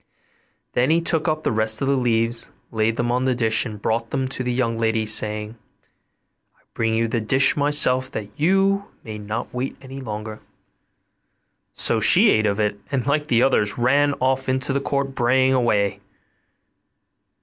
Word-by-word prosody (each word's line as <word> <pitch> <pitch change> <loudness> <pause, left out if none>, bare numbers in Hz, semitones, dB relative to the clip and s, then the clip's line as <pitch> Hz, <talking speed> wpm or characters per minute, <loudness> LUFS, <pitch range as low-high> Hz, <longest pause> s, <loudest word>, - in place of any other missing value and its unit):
Then 125 +3 +1
he 165 +1 +3
took 165 -1 0
up 155 0 -1
the - - 0
rest 110 0 0
of 135 - -2
the 140 - +2
leaves, 115 -2 0 0.2
laid 110 0 0
them 120 0 0
on 125 +1 0
the 130 -1 +1
dish 115 0 +1
and 105 -2 -8
brought 115 +2 -2
them 135 -1 -2
to 130 - -5
the 125 -1 -2
young 120 -2 0
lady, 115 -1 0
saying, 105 +1 -1 1.0
'I - - -32
bring 115 -1 0
you 115 +1 +1
the 115 0 -2
dish 130 +5 +3
myself 140 -3 +2
that 110 -6 -6
you 195 +5 +2 0.2
may 110 -2 -7
not 105 +2 -5
wait 125 +2 -4
any 135 0 -10
longer.' 110 -2 -6 1.3
So - - 0
she - - +5
ate 110 0 +2
of 100 +1 -1
it, 105 -1 -1
and 130 -4 -1
like 150 +1 0
the 120 -3 +3
others 105 -6 +1
ran 140 +4 +2
off 130 0 -1
into 130 +1 -1
the 140 - 0
court 140 -1 -2
braying 130 +1 +2
away. 105 -6 +1
120 Hz, 175 wpm, -22 LUFS, 110-135 Hz, 1.3 s, she